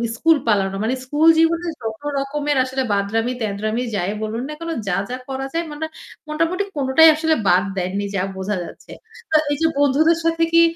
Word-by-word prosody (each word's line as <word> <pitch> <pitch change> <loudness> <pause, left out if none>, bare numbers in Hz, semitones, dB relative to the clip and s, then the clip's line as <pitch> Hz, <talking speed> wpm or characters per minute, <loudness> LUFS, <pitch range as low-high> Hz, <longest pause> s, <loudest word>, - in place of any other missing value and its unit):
School 320 +6 +4
পালানো। 195 -3 +1
মানে 235 +4 0
school 295 +4 +2
জীবনে 335 +1 +2
যত 220 +1 -5 0.2
রকমের 285 +1 -1
আসলে 260 +1 -2
বাঁদরামি-তেদরামি 215 +1 -1
যায় 190 0 -1
বলুন 220 +2 -3
না। 305 - -4 0.3
যা 180 - +1
যা 250 - -3
করা 270 0 -3
যায় 335 +1 -1
মানে 305 +2 -4 0.4
মোটামুটি 330 +5 0
কোনটাই 285 +3 +6
আসলে 315 0 +1
বাদ 180 +1 +4
দেননি 190 +2 -2
যা 190 - +1
বোঝা 190 +2 -2
যাচ্ছে। - - -12 0.4
তো 315 - +2 0.2
এই - - +1
যে 325 - +4
বন্ধুদের 295 +4 +3
সাথে 330 0 +1
কি 335 - +7
265 Hz, 175 wpm, -20 LUFS, 215-315 Hz, 0.4 s, কি